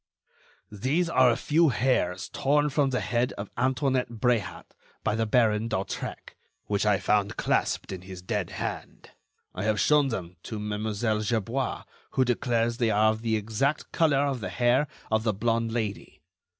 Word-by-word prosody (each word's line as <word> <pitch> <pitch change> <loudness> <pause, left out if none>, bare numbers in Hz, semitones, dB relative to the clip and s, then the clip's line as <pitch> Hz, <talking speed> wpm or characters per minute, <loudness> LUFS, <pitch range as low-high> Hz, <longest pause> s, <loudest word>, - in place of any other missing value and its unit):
"These 140 - 0
are 130 -5 +5
a 115 - +3
few 165 +1 +3
hairs 95 -8 0
torn 145 +2 +1
from 140 -1 +2
the 125 -1 -1
head 120 +1 0
of 100 0 -7
Antoinette 130 -1 +1
Bréhat 115 -3 0 0.4
by 105 - +1
the 110 +1 0
Baron 110 -1 +2
d'Hautrec, 95 -4 -4 0.3
which 105 +1 0
I 105 -2 +4
found 105 +1 0
clasped - - 0
in 95 -2 -6
his 95 -1 -10
dead 100 -2 -2
hand. - - -6 0.4
I 90 - -4
have 110 -1 +1
shown 150 +6 +4
them 90 -8 -5
to 110 - -6
Mlle. 105 +1 -1
Gerbois, 115 +4 -1 0.3
who 130 - +3
declares 120 -1 0
they 120 -3 +2
are 110 +1 +4
of 110 0 -5
the 115 -1 0
exact 110 +8 -1
color 145 -4 +3
of 135 -3 -1
the 95 - -3
hair 120 - +2 0.2
of 110 0 +3
the 110 -1 0
blonde 115 +2 0
Lady. 110 -9 -4
115 Hz, 165 wpm, -27 LUFS, 105-130 Hz, 0.4 s, are